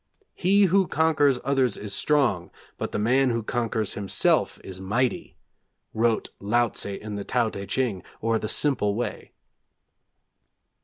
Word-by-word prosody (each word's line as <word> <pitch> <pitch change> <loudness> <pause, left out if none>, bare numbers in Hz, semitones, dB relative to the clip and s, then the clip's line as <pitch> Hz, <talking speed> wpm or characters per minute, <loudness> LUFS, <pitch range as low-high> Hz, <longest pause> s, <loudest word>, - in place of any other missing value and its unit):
'He 200 +3 +4
who 190 0 +3
conquers 150 -5 +2
others 130 -4 +1
is 105 -1 -6
strong, 130 - +1 0.3
but - - -3
the - - -2
man 125 +5 +2
who 115 -1 -1
conquers 110 -3 -2
himself 100 -2 +1
is 95 -1 -9
mighty,' 120 +7 -1 0.6
wrote 115 0 +1
Laotze 105 -2 0
in 105 -1 -6
the 100 - -4
Tao 120 -1 0
Teh 100 0 -7
Ch'ing, 115 -4 -1 0.2
or 115 0 0
'The 110 - -4
Simple 115 -9 +1
Way.' 120 +2 -4
115 Hz, 140 wpm, -25 LUFS, 105-135 Hz, 0.6 s, He